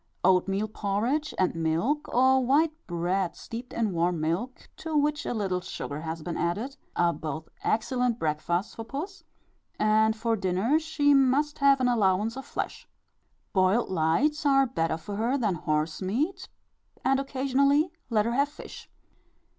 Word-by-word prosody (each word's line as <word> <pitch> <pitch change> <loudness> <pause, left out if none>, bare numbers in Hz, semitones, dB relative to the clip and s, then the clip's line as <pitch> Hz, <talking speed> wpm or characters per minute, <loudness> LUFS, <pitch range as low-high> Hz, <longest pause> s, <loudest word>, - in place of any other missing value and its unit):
Oatmeal 195 +3 +2
porridge 220 +9 -1
and 185 - +2
milk, 165 - 0
or 260 +1 +4
white 300 +5 +3
bread 175 +1 -1
steeped 235 +2 -8
in 220 -4 -1
warm 170 0 +1
milk, 175 +12 -3
to 315 -1 -2
which 295 0 0
a - - -1
little 190 -4 -1
sugar 150 -4 -6
has 160 0 -5
been 175 0 -4
added, 210 +11 -2 0.2
are 170 -1 +2
both 155 0 -6
excellent 245 +1 0
breakfasts 165 +4 -1
for 225 - -6
puss; 305 - -6 0.5
and 220 +1 +3
for 230 0 0
dinner 195 - +1
she 305 -2 +2
must 275 +2 +2
have 275 -1 +5
an 255 - +2
allowance 215 -1 +2
of 270 - -7
flesh. - - -5 0.6
Boiled 190 +4 +2
lights 190 - +1
are 275 -2 +4
better 165 -10 -1
for 200 +5 -7
her 240 +5 +1
than 215 -7 +1
horse 155 0 -1
meat, 295 - -2 0.6
and 270 +1 +3
occasionally 275 +3 +2 0.2
let 215 -3 +2
her 235 - 0
have 280 +3 +2
fish. 290 - -11
225 Hz, 155 wpm, -27 LUFS, 180-275 Hz, 0.6 s, have